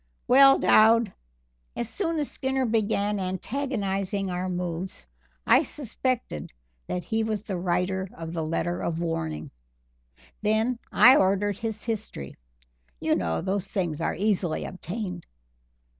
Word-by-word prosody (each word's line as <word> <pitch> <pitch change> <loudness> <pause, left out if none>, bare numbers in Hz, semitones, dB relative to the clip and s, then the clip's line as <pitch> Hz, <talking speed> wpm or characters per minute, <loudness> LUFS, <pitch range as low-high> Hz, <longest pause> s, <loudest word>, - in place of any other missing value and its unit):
"Well, 270 +1 +8
Dowd, 225 -1 +5 0.6
as 235 - -2
soon 330 - -2
as 295 -2 -2
Skinner 265 0 -1
began 210 -2 +1
antagonizing 195 -1 -2
our 180 +1 -2
moves, 180 - -4 0.4
I - - +6
suspected 250 - -3 0.4
that 180 - -3
he 225 0 0
was 215 -2 -2
the 200 -3 -4
writer 180 +2 -1
of 165 0 -6
the 165 -2 -2
letter 165 +2 -1
of 165 -1 -2
warning. 80 - -3 0.9
Then 220 +3 +1
I 255 +2 +8
ordered 195 +1 +2
his 220 -2 -4
history 215 - -5 0.6
you - - +1
know 80 -2 0
those 195 0 -1
things 170 -5 -1
are - - 0
easily 190 -4 0
obtained. 180 -1 -5
195 Hz, 130 wpm, -26 LUFS, 175-225 Hz, 0.9 s, Well